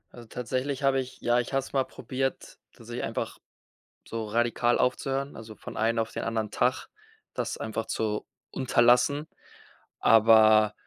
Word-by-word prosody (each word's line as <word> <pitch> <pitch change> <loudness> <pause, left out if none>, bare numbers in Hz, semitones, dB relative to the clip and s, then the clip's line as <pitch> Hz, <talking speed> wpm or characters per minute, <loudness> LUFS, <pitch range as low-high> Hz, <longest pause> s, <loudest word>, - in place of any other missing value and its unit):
Also, 120 -2 -12
tatsächlich 130 +4 -3
habe 135 -1 +3
ich 130 0 -10
ja, 120 +1 +2
ich 120 - -4
habe 135 - +2
es 135 - -12
mal 135 -1 +2
probiert, 135 0 -4
tatsächlich - - -7
einfach - - -4 0.7
so 115 -1 -4
radikal 120 +2 +1
aufzuhören, 135 +2 -1
also, 110 -1 -10
von - - -9
einen 115 +1 +1
auf 115 - -1
den - - -4
anderen 110 -2 -2
Tag 125 +4 0 0.5
das - - -3
einfach 110 0 -4
zu 105 -1 -2 0.2
unterlassen. 130 +4 +3 0.7
Aber 110 -1 +6
120 Hz, 150 wpm, -27 LUFS, 110-130 Hz, 0.7 s, Aber